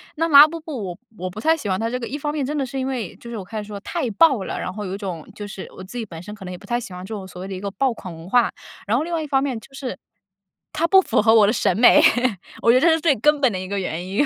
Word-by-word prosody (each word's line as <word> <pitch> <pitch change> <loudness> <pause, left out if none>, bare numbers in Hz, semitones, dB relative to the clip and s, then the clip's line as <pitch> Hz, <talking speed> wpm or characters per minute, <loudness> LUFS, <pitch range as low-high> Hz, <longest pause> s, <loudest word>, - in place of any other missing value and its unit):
那 330 +1 0
拉 290 0 +10
布 330 +1 -6
布 295 -9 -6
我 180 -2 -6 0.2
我 185 - -3
不 185 - -9
太 320 +8 +3
喜 225 -11 -5
欢 185 - 0
它 225 - -1
这 250 - -2
个 235 - -5
一 290 - -4
方 295 0 -3
面 295 - -1
真 295 +3 -2
的 275 - 0
是 270 +1 -5
因 260 - -2
为 245 -8 -4
就 235 - -11
是 235 - -5
我 190 - -7
开 215 +2 -5
始 205 - -10
说 205 -1 -7
太 240 - -3
爆 265 -2 +4
了， - - -4
然 185 - -4
后 210 0 -5
有 190 0 -4
一 - - -5
种 180 -6 -6
就 205 - -6
是 195 -1 -8
我 185 - -8
自 195 +6 -12
己 225 - -3
本 165 -3 -9
身 210 +2 -8
可 205 - -11
能 180 - -6
也 180 - -6
不 - - -15
太 240 -1 -1
喜 230 - -9
欢 180 0 -8
这 220 - -7
种 195 -3 -6
所 180 - -11
谓 190 - -6
的 195 - -6
一 185 - -5
个 200 - -3
爆 260 +5 0
款 185 -5 -9
文 165 +1 -11
化， 240 +4 +3 0.4
然 225 +3 +2
后 290 - 0
另 345 +2 -5
外 330 - 0
一 305 - -5
方 270 -1 +2
面 260 -5 -2
就 270 - -18
是 265 -2 -5 0.8
它 335 +2 +1
不 385 +3 +7
符 345 - +1
合 220 +1 +5
我 210 -2 +7
的 215 - +2
审 190 - +1
美， 240 - +7 0.6
我 230 - +6
觉 255 - +5
得 - - -4
这 - - +7
是 320 0 +3
最 310 -3 +3
根 300 +6 +3
本 265 -4 +3
的 185 - -3
一 185 - -6
个 200 +1 -3
原 180 -1 -4
因。 200 +10 +1
225 Hz, 380 characters per minute, -22 LUFS, 190-275 Hz, 0.8 s, 拉